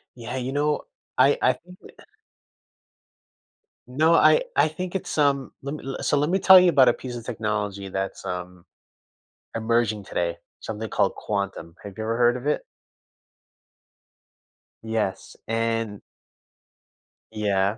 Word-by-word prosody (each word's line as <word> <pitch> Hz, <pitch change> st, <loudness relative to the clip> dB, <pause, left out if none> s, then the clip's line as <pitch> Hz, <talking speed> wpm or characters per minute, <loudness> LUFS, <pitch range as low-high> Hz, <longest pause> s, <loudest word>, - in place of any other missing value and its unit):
Yeah, 120 Hz, +2 st, -6 dB
you 130 Hz, +1 st, -3 dB
know, 150 Hz, +1 st, +1 dB, 0.4 s
I 135 Hz, +2 st, +5 dB
I 130 Hz, -, +4 dB
think 180 Hz, +8 st, -16 dB
that, -, -, -15 dB
uh -, -, -14 dB, 1.8 s
No, 155 Hz, +6 st, +3 dB
I 485 Hz, -, +5 dB
I -, -, +4 dB
think 180 Hz, +4 st, -6 dB
it's, 190 Hz, -, -3 dB
um, 140 Hz, -3 st, +2 dB
let 140 Hz, +2 st, -4 dB
me 135 Hz, -3 st, -6 dB
So, 145 Hz, -, +1 dB
let 145 Hz, +2 st, +1 dB
me 190 Hz, +2 st, +2 dB
tell 190 Hz, -1 st, +9 dB
you 180 Hz, -, +5 dB
about 135 Hz, -6 st, +5 dB
a 120 Hz, -, +3 dB
piece 125 Hz, -2 st, -7 dB
of 115 Hz, -, -9 dB
technology 105 Hz, -4 st, -3 dB
that's, 95 Hz, +1 st, -4 dB
um, 90 Hz, -1 st, -6 dB, 0.9 s
emerging 110 Hz, -2 st, 0 dB
today, 85 Hz, -2 st, -2 dB, 0.2 s
something 110 Hz, 0 st, -5 dB
called -, -, +1 dB
quantum. 100 Hz, -5 st, -4 dB
Have 100 Hz, -1 st, -9 dB
you 110 Hz, -, -3 dB
ever 115 Hz, +1 st, -1 dB
heard 120 Hz, 0 st, +3 dB
of 125 Hz, +2 st, -8 dB
it? 150 Hz, -, +1 dB, 2.2 s
Yes, 110 Hz, -4 st, -3 dB
and 115 Hz, -2 st, -1 dB, 1.3 s
Yeah. 100 Hz, 0 st, 0 dB
115 Hz, 140 wpm, -24 LUFS, 105-140 Hz, 2.2 s, tell